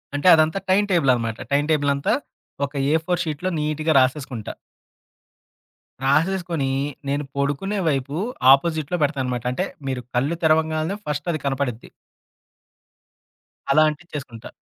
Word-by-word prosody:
అంటే, 145 +5 0
అదంతా 160 +4 +2
time 200 +2 +4
table 165 -7 +4
అనమాట. 115 -2 -3
టైమ్ 145 +1 +2
టేబుల్ 145 -2 +2
అంతా, 140 +8 0 0.5
ఒక 140 - -21 0.2
ఏ - - +4
ఫోర్ 180 0 0
షీట్‌లో 160 +4 -2
నీట్‌గా 155 +1 0
రాసేసుకుంటా. 130 -4 -1 1.5
రాసేసుకొని 165 0 +1 0.4
నేను 140 +1 -1
పొడుకునే 145 +9 -1
వైపు 140 0 -2 0.4
ఆపోజిట్‌లో 155 +3 +2
పెడతాననమాట. 130 -5 -1
అంటే, 125 - -1 0.2
మీరు 130 -2 -3
కళ్ళు 140 +7 +1
తెరవంగాల్నే 160 +3 +1
ఫస్ట్ 150 +1 -3
అది 155 - -2
కనపడిద్ది. 135 -4 -2 1.8
అలా 155 +3 +5
అంటిచేసుకుంటా. 145 -7 -8
150 Hz, 120 wpm, -22 LUFS, 135-160 Hz, 1.8 s, అలా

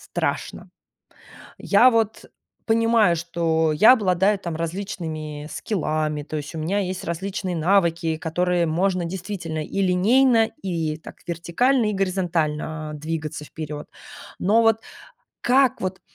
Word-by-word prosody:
страшно. - - -3 0.9
Я 235 +5 +5
вот 225 -2 0 0.4
понимаю, 225 -4 +3
что 165 -1 0
я 210 +11 +7
обладаю 200 -3 +2
там 170 -4 -5
различными 160 -4 -5
скиллами, 155 -6 -2
то 155 - -5
есть 150 +2 -6
у - - -4
меня 180 +6 0
есть 185 -1 -4
различные 185 +2 -3
навыки, 170 -2 +2
которые 175 +2 0
можно 180 +3 0
действительно 170 -3 -4
и 195 - -3
линейно, 225 +6 +4
и 165 -5 -2
так 160 - -12
вертикально, 210 - +1
и - - -2
горизонтально, 165 -5 -1
а, - - -6
двигаться 155 0 -5
вперед. 150 -1 -7 0.5
Но 215 +5 +4
вот 225 -1 +3 0.6
как 260 0 +3
вот, 185 0 -3
175 Hz, 125 wpm, -23 LUFS, 160-200 Hz, 0.9 s, я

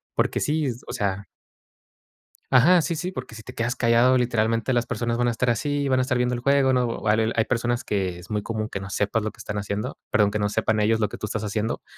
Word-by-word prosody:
porque - - +1
sí, 155 +1 0
es, 120 0 -4
o - - -5
sea 100 -1 -2 1.3
Ajá, 165 +8 +6
sí, 160 +3 -2
sí, 180 +4 -3
porque 115 - -7
si 110 - -10
te - - -10
quedas 120 +2 -1
callado, 125 +1 +4
literalmente, 115 0 +1
las 120 0 +1
personas 120 0 -2
van 120 - +2
a 120 - +2
estar 120 +1 +1
así, 145 +4 -1
van 130 -1 +2
a - - +3
estar 130 -1 0
viendo 125 0 +1
el 120 - -3
juego, 140 0 +3
no, 125 -2 0
vale 110 +1 +1
hay 110 - +2
personas 120 0 -1
que 95 -4 -2
es 90 +5 -12
muy 105 - 0
común 110 0 -3
que 100 - -4
no 95 0 -7
sepas 105 +2 0
lo 110 - -2
que - - -18
están 105 0 -4
haciendo, 100 +1 -4
perdón, 105 -1 +3
que 105 - -2
no 105 0 +1
sepan 110 +1 0
ellos 110 +1 +2
lo 105 -2 +1
que - - -8
tú 105 - -3
estás 110 +1 -3
haciendo. 110 +2 -2
115 Hz, 255 wpm, -24 LUFS, 105-125 Hz, 1.3 s, Ajá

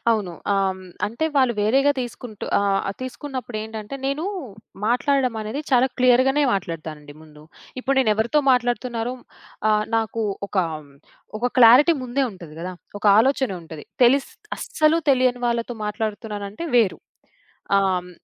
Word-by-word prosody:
అవును. 210 -6 0 0.2
ఆహ్, 195 -1 +2
హ్మ్, 190 - -12 0.2
అంటే, 235 +9 -3
వాళ్ళు 260 -3 +4
వేరేగా 270 +7 +3
తీసుకుంటూ 240 -3 -7
ఆహ్, 200 -1 +1
ఆ - - 0
తీసుకున్నప్పుడేంటంటే, 245 -4 -6
నేనూ 280 +5 -1 0.6
మాట్లాడడమనేది 250 -1 0
చాలా 255 0 +5
క్లియర్‌గానే 255 +3 +4
మాట్లాడతానండి 155 -6 -6
ముందు. 150 -1 -16 0.4
ఇప్పుడు 275 +1 0
నేనెవరితో 230 +5 +2
మాట్లాడుతున్నారో 245 -1 0 0.6
ఆహ్, 210 0 +2
నాకూ 225 0 -1 0.2
ఒకా, 190 -3 0 0.7
ఒక 245 +3 0
క్లారిటీ 250 +8 +8
ముందే 260 +2 0
ఉంటది 170 -5 -12
గదా! 180 +2 -5 0.3
ఒక - - -16
ఆలోచన 265 +1 +2
ఉంటది. 160 -2 -10 0.2
తెలిస్ 270 +3 +3 0.3
అస్సలు 310 +1 +2
తెలియని 255 -2 +2
వాళ్ళతో 235 0 -1
మాట్లాడుతున్నానంటే 210 +3 -4
వేరు. 220 -6 +3 0.8
ఆహ్, 195 -1 +3
హ్మ్, 180 0 -10
235 Hz, 125 wpm, -22 LUFS, 205-260 Hz, 0.8 s, క్లారిటీ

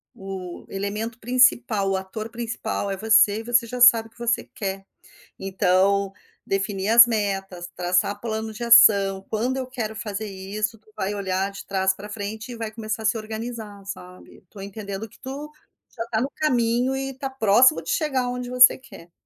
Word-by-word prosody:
o 190 -2 -8
elemento 210 +4 -4
principal, 240 -4 +2
o 195 - +1
ator 205 +4 -5
principal 230 -3 -4
é 195 - -3
você 220 0 +4
e 225 - -7
você 240 0 +2
já 250 +2 -6
sabe 235 -2 +6
o - - -40
que - - -27
você 235 0 0
quer. 195 -1 -5 0.6
Então, 195 +1 +1 0.3
definir 195 0 -2
as 235 +1 +9
metas, 195 -5 -3
traçar 180 +3 0
plano 220 -1 -4
de 215 - -7
ação, 200 -5 +6
quando 245 +5 -1
eu 260 - -3
quero 220 -4 -5
fazer 215 -1 -5
isso 205 +3 -4
tu 215 0 -26
vai 195 +2 -3
olhar 190 0 -2
de 195 - -10
trás 190 -1 +1
para 205 +1 -9
frente 215 +3 -6
e 240 - -7
vai 225 -1 -5
começar 220 0 -5
a - - -5
se 220 +1 +2
organizar, 220 -2 -7
sabe? 180 -2 -10
Estou 195 +2 -14
entendendo 200 +1 -7
que - - -20
tu, 285 +3 -7 0.4
já 230 - -3
está 230 -1 -2
no 265 - -1
caminho 250 -3 +1
e 270 0 -3
está 270 +1 -5
próximo 255 +2 +4
de - - -9
chegar 290 - 0
onde 245 0 -5
você 250 0 +7
quer. 175 -9 -15
215 Hz, 185 wpm, -23 LUFS, 195-235 Hz, 0.6 s, as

